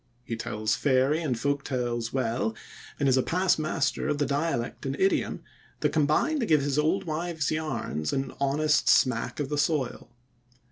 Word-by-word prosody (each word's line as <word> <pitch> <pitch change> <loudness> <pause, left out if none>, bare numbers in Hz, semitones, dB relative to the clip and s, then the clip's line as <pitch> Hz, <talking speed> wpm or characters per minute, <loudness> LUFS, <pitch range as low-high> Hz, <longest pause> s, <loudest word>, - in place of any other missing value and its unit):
He 115 - -4
tells 110 -1 -2
fairy 140 +3 +2
and 135 -7 -1
folk 140 +1 0
tales 120 -3 -2
well, 115 -3 -1 0.4
and 140 - +2
is 130 -1 +4
a - - +4
past 180 +4 +1
master 155 -1 -1
of 150 - 0
the 145 - +1
dialect 140 -3 -2
and 135 0 -3
idiom 195 +1 +1 0.4
that - - +1
combine 155 - +2
to 235 - -1
give 150 -3 +4
his 145 +1 0
old 170 +6 +1
wives' 160 -2 -2
yarns 155 - -2
an 135 0 -2
honest 150 +2 +2
smack 125 0 +2
of 145 -2 -2
the 150 -1 -1
soil. 145 -6 -1
145 Hz, 175 wpm, -27 LUFS, 130-155 Hz, 0.4 s, is